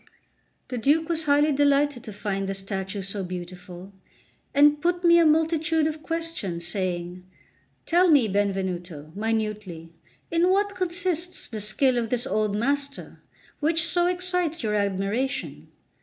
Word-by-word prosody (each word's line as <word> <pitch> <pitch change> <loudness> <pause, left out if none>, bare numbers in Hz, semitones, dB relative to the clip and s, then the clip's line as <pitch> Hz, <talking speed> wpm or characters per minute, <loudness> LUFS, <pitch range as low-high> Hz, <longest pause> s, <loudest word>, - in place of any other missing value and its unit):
The 250 - -3
Duke 305 +7 +2
was 325 -2 -1
highly 295 +1 +3
delighted 285 -2 +2
to 215 - -7
find 195 -1 -3
the 195 - -2
statue 195 0 -4
so 195 +1 -3
beautiful, 180 +1 -8 0.6
and 295 +1 +4
put 350 +1 0
me 340 0 +6
a 330 - +5
multitude 320 0 +2
of 310 0 -3
questions, 325 - -4
saying: 180 -1 -3 0.6
"Tell 355 +2 +4
me, 280 -8 +5
Benvenuto, 185 -6 -2
minutely, 210 -6 -3 0.4
in 335 +2 +3
what 400 +2 +2
consists 355 -1 -1
the 220 - -6
skill 245 +5 +2
of 230 -2 -3
this 245 +1 -1
old 215 -5 0
master, 280 +5 -2 0.4
which 320 +2 +3
so 350 0 +2
excites 360 -3 -1
your 215 -1 -1
admiration." 205 +6 -2
250 Hz, 140 wpm, -25 LUFS, 195-325 Hz, 0.6 s, me